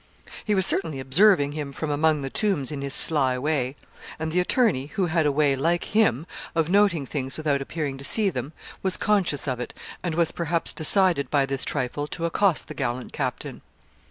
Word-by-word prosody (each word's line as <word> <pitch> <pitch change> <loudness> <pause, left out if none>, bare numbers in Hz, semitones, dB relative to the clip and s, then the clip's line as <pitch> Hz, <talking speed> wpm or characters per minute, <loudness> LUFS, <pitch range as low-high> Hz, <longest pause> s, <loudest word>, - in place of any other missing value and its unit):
He 210 - 0
was 190 -1 +5
certainly 160 -9 -1
observing 145 +3 +3
him 145 -2 -5
from 150 +2 -4
among 150 0 +1
the 135 - -5
tombs 190 - -1
in 145 -2 -5
his 140 0 +1
sly 135 -5 +6
way. 135 -1 -2 0.4
And 160 0 -4
the 180 - +1
attorney, 180 - +1
who 195 +3 -2
had 160 -2 +1
a - - +2
way, 140 -1 +2
like 170 +6 0
him, 185 - +1 0.3
of 165 +1 0
noting 195 -7 +3
things 135 -1 -4
without 150 -3 -1
appearing 140 -1 -4
to - - -9
see 200 +7 +2
them, 145 - -5 0.3
was 190 -1 +1
conscious 190 -9 0
of 130 -2 -2
it, 125 - -7 0.3
and 170 -3 -2
was 170 -1 +1
perhaps 170 0 -1
decided 170 -2 +2
by 140 -2 +2
this 135 -1 -3
trifle 145 +1 -3
to 165 +2 -5
accost 180 +1 +1
the 155 - -7
gallant 125 -3 -4
captain. - - -4
155 Hz, 195 wpm, -24 LUFS, 140-175 Hz, 0.4 s, sly